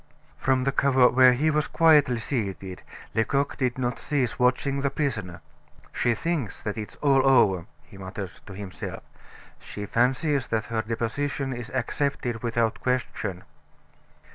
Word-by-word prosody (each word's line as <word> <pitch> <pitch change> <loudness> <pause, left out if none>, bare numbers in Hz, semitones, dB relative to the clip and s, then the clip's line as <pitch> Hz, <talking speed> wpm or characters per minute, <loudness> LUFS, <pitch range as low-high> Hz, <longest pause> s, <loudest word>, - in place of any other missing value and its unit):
From 130 -1 +2
the 140 - +1
corner 130 -2 +4
where 130 0 +6
he 155 +5 +2
was 150 0 +1
quietly 150 -6 +4
seated, 100 -6 -4 0.3
Lecoq 140 +5 0
did 125 -3 -1
not 125 -1 -2
cease 135 -6 -1
watching 135 +2 +1
the 140 - +1
prisoner. 110 - -3 0.5
"She 120 -1 +1
thinks 155 - -2
that 105 - -3
it's 110 -2 -6
all 135 -2 +4
over," 95 -10 +4 0.2
he 95 - -15
muttered 95 0 -6 0.2
to 100 - -8
himself; 95 -1 -7 0.6
"she 105 - -7
fancies 130 +5 +1
that 110 -2 -1
her 115 -1 -1
deposition 130 +5 -2
is 120 -1 -7
accepted 125 -2 -2
without 115 -1 0
question." 110 -7 -2
125 Hz, 140 wpm, -26 LUFS, 110-140 Hz, 0.6 s, where